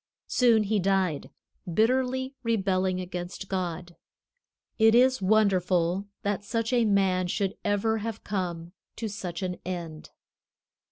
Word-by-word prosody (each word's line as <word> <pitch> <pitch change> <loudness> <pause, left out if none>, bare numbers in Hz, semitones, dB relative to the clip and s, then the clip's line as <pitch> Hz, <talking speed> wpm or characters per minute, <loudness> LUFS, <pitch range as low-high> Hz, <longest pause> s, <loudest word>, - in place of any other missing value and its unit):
Soon 235 -3 +3
he 210 +1 +1
died, 190 -5 0 0.4
bitterly 260 +6 +1
rebelling 190 -5 0
against 180 +1 -6
God. 175 -2 -4 0.8
It 220 +1 +6
is 255 -1 +4
wonderful 185 -2 +2 0.2
that 205 -1 -1
such 230 +3 -2
a 240 -2 +3
man 190 -3 +2
should 195 +2 -1
ever 215 +2 +1
have 225 0 -5
come 175 -4 -3 0.2
to 225 - -4
such 190 -3 -5
an 180 -1 -3
end." 170 -4 -6
195 Hz, 120 wpm, -27 LUFS, 180-220 Hz, 0.8 s, It